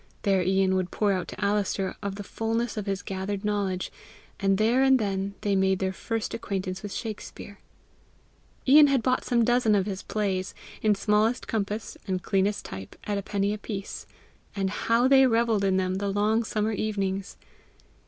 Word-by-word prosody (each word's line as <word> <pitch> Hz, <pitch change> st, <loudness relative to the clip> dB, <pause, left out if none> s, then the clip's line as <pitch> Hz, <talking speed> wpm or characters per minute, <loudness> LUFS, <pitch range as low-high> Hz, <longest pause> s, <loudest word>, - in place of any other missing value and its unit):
There 195 Hz, -2 st, +3 dB
Ian 190 Hz, +1 st, +2 dB
would 185 Hz, -1 st, 0 dB
pour 210 Hz, -2 st, +1 dB
out 185 Hz, -2 st, -1 dB
to -, -, -9 dB
Alister 200 Hz, -1 st, 0 dB
of 200 Hz, -2 st, -3 dB
the 205 Hz, -, -6 dB
fullness 225 Hz, +3 st, -2 dB
of 210 Hz, -2 st, -4 dB
his 195 Hz, 0 st, -2 dB
gathered 195 Hz, +1 st, -4 dB
knowledge, 200 Hz, -3 st, -1 dB, 0.5 s
and 195 Hz, -1 st, +2 dB
there 230 Hz, +5 st, +3 dB
and 265 Hz, -1 st, +6 dB
then 200 Hz, -2 st, -2 dB
they 200 Hz, -1 st, +1 dB
made 190 Hz, 0 st, +3 dB
their 190 Hz, 0 st, -1 dB
first 225 Hz, +2 st, -3 dB
acquaintance 190 Hz, -3 st, -3 dB
with 205 Hz, -, -6 dB
Shakspere. 205 Hz, -2 st, -7 dB, 1.1 s
Ian 295 Hz, +3 st, +8 dB
had 270 Hz, -4 st, +2 dB
bought 255 Hz, 0 st, +1 dB
some 235 Hz, -2 st, +2 dB
dozen 240 Hz, -3 st, +3 dB
of 195 Hz, -2 st, +2 dB
his 195 Hz, -2 st, -4 dB
plays, 195 Hz, -3 st, -2 dB, 0.3 s
in 215 Hz, -1 st, +3 dB
smallest 210 Hz, +4 st, +1 dB
compass 210 Hz, 0 st, -3 dB
and 185 Hz, -1 st, -2 dB
cleanest 200 Hz, +1 st, 0 dB
type, 95 Hz, 0 st, -8 dB
at 205 Hz, -1 st, -1 dB
a -, -, -3 dB
penny 200 Hz, +1 st, -1 dB
a 210 Hz, -, -5 dB
piece, 200 Hz, -2 st, -6 dB, 0.5 s
and 195 Hz, -2 st, -1 dB
how 230 Hz, +4 st, +2 dB
they 265 Hz, 0 st, +6 dB
revelled 225 Hz, -3 st, +2 dB
in 190 Hz, -1 st, +2 dB
them 185 Hz, 0 st, 0 dB
the 200 Hz, 0 st, -1 dB
long 210 Hz, +3 st, +2 dB
summer 215 Hz, 0 st, -1 dB
evenings! 200 Hz, -2 st, -2 dB
205 Hz, 180 wpm, -27 LUFS, 195-220 Hz, 1.1 s, Ian